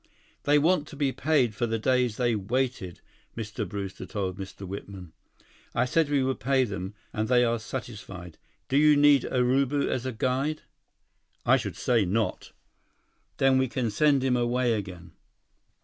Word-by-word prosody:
"They 145 +1 +5
want 155 0 +2
to - - -10
be 140 -2 0
paid 130 -5 +1
for 120 +3 -1
the 115 0 -1
days 125 -1 +1
they 120 -2 +1
waited," 110 -2 -2 0.4
Mr. 105 -2 -4
Brewster 100 -1 -6
told 95 -4 -3
Mr. 95 0 -8
Whitman. 95 -3 -8 0.6
"I 125 - +2
said 155 +4 +1
we 140 -2 +2
would 130 0 -1
pay 130 +4 +2
them, 100 -3 -5 0.2
and 110 0 -1
they 125 0 +4
are 115 0 0
satisfied. 105 -8 -8 0.3
Do 135 - +1
you 150 0 +6
need 145 -2 +5
Urubu 135 +3 +1
as 130 +1 -2
a - - -2
guide?" 130 +6 -1 0.8
"I - - +6
should - - -5
say 120 -4 +2
not!" 105 +4 -2 0.9
"Then 135 -1 +4
we 130 - +2
can 125 -3 -2
send 140 +3 +3
him 130 -1 +2
away 120 0 +1
again." 90 -5 -6
125 Hz, 165 wpm, -27 LUFS, 105-135 Hz, 0.9 s, you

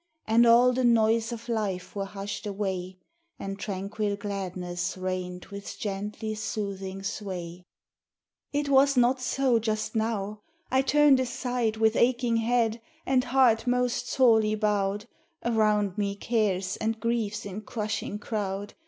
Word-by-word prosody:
And 230 +2 +5
all 245 +2 +6
the 255 +1 0
noise 225 -1 +3
of 230 0 -7
life 210 -6 -2
were 200 -1 -2
hushed 205 +1 -6
away, 190 -2 -3 0.4
And 195 0 -6
tranquil 200 +1 -2
gladness 185 -3 -4
reigned 185 -1 -4
with 200 0 -7
gently 210 +2 -4
soothing 200 -3 -4
sway. 180 -4 -5 0.9
It 290 0 -1
was 275 0 +4
not 250 +1 +3
so 255 -2 +2
just 215 -1 -2
now. 215 -2 -1 0.3
I 260 +1 +4
turned 285 0 +5
aside 245 -3 -1
With 220 0 +3
aching 240 -1 +2
head, 230 0 +1 0.2
and 260 -1 +2
heart 245 -2 +3
most 250 0 0
sorely 220 -4 +4
bowed; 205 -1 0 0.4
Around 210 -4 +2
me 200 -1 0
cares 200 -4 0
and 225 0 -2
griefs 225 -2 -1
in 200 +1 -6
crushing 215 -1 -3
crowd. 205 -1 -4
215 Hz, 135 wpm, -27 LUFS, 200-235 Hz, 0.9 s, all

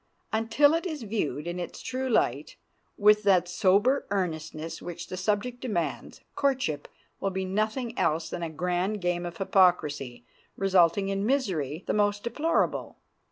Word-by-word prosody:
Until 225 +7 +4
it 335 +3 0
is 310 -7 -5
viewed 160 - -2
in 175 +1 -4
its 175 - -6
true 260 +1 -3
light, - - +1 0.4
with 210 +1 +5
that 190 -4 +3
sober 205 +9 +2
earnestness 165 -4 -3
which 175 -1 -6
the - - -6
subject 210 +6 -1
demands, 210 -10 -3
courtship 260 - 0 0.3
will 195 - 0
be 190 0 -3
nothing 215 +5 -1
else 160 0 +1
than 175 - -5
a 165 - -2
grand 180 +6 -1
game 175 -1 -1
of 170 -1 -8
hypocrisy, 150 -11 +2 0.3
resulting 195 0 +3
in 195 0 -1
misery 185 - -1
the - - -1
most 205 -1 +1
deplorable. 300 +7 0
195 Hz, 150 wpm, -27 LUFS, 175-225 Hz, 0.4 s, with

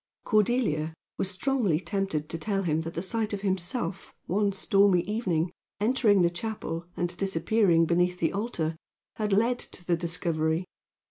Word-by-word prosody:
Cordelia 210 -9 +1 0.2
was 190 - +1
strongly 205 - +1
tempted 190 -6 -2
to 165 - -5
tell 195 +1 -1
him 160 -2 +1
that 165 +1 -6
the 170 - -2
sight 220 +2 -1
of 200 - -3
himself, 190 0 -2
one 200 +3 +1
stormy 195 -1 +3
evening, 185 -5 -1 0.3
entering 210 -4 +4
the 170 - +3
chapel, 175 -3 -4
and 175 0 0
disappearing 190 -1 +3
beneath 180 +2 +2
the 165 - 0
altar, 185 -7 -2 0.4
had 210 -1 -1
led 230 +5 +3
to 180 - -5
the 175 - +2
discovery. 165 -1 -1
185 Hz, 150 wpm, -28 LUFS, 170-210 Hz, 0.4 s, entering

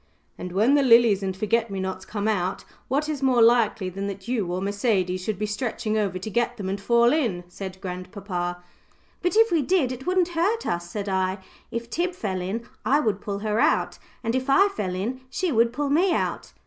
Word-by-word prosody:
"And 180 - -7
when 215 +9 +3
the 290 - +5
lilies 230 -5 +5
and 190 -1 -3
forget 225 +3 +1
me 195 -1 -4
nots 190 0 -4
come 210 -1 -3
out, 190 -3 -1 0.2
what 285 +4 0
is 300 -3 -3
more 260 -3 +3
likely 230 -4 +4
than 195 +2 -4
that 195 +1 -7
you 220 -8 -1
or 180 - -1
Mercedes 195 -2 0
should 210 0 -2
be 210 - -1
stretching 215 0 -2
over 200 -4 0
to 185 +4 -5
get 240 +2 0
them 195 -3 -4
and 195 +1 -3
fall 235 +3 +4
in," 230 - 0
said 190 +1 -8
grandpapa. 180 -1 -5 0.6
"But 360 +2 0
if 450 0 +5
we 330 -3 +3
did 285 -3 +1
it 255 +4 -7
wouldn't 365 -1 +2
hurt 370 +7 0
us," 175 0 -2
said 205 +2 -4
I. 190 0 0 0.3
"If 235 0 -4
Tib 350 +7 -2
fell 190 - -3
in, 220 +6 -4 0.2
I 280 +3 +3
would 210 -8 0
pull 200 -1 -3
her 215 +1 +1
out, - - +2 0.2
and 230 0 -1
if 260 +2 -1
I 390 +9 +5
fell 190 - -3
in, 235 +8 -3
she 370 +2 -1
would 230 -2 +3
pull 285 +2 -2
me 350 +6 +3
out." - - -2
215 Hz, 215 wpm, -25 LUFS, 190-260 Hz, 0.6 s, the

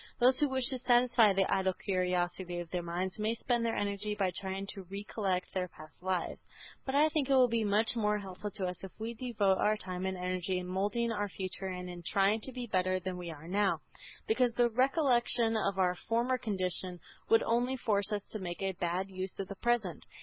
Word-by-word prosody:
Those 255 +2 +6
who 295 - +3
wish 260 -2 +2
to 260 - 0
satisfy 240 -3 +5
the 195 0 +2
idle 190 -1 +2
curiosity 180 -1 -1
of 175 -1 -6
their 180 - -1
minds 180 +3 -3
may 215 +2 0
spend 240 0 0
their 230 -1 0
energy 205 +1 -2
by 195 -3 +1
trying 190 +2 -4
to 195 - -8
recollect 195 -2 -2
their 185 -1 -1
past 155 -1 -14
lives. 185 -1 -2 0.4
But 265 - -1
I 300 +2 +6
think 300 -4 0
it 270 - +5
will 255 -1 +6
be 230 -1 0
much 215 +3 +2
more 210 -2 +1
helpful 195 0 -6
to 195 -3 -1
us 180 0 -5
if 190 - -6
we 225 +2 -3
devote 220 -5 +1
our 215 0 +3
time 185 -2 -4
and 190 0 -2
energy 185 +1 -1
in 180 - -3
moulding 205 +6 0
our 205 -2 -1
future 190 0 -5
and 180 -1 -5
in 175 -1 -7
trying 200 +5 +2
to 265 - -1
be 250 -1 -5
better 185 -3 +1
than 185 0 -4
we 175 -1 -6
are 160 0 -9
now, 200 +2 +1 0.4
because 250 - +2
the 240 -1 +3
recollection 245 -3 +3
of 200 -3 0
our 180 -1 +3
former 235 +7 0
condition 185 -4 -1 0.3
would 225 - +5
only 245 +3 +1
force 205 -4 0
us 205 -1 -2
to 215 - -4
make 175 0 -5
a 195 - +1
bad 180 +1 -2
use 185 -1 -4
of 195 - -4
the 200 - -5
present. 230 -9 0
200 Hz, 215 wpm, -32 LUFS, 185-235 Hz, 0.4 s, Those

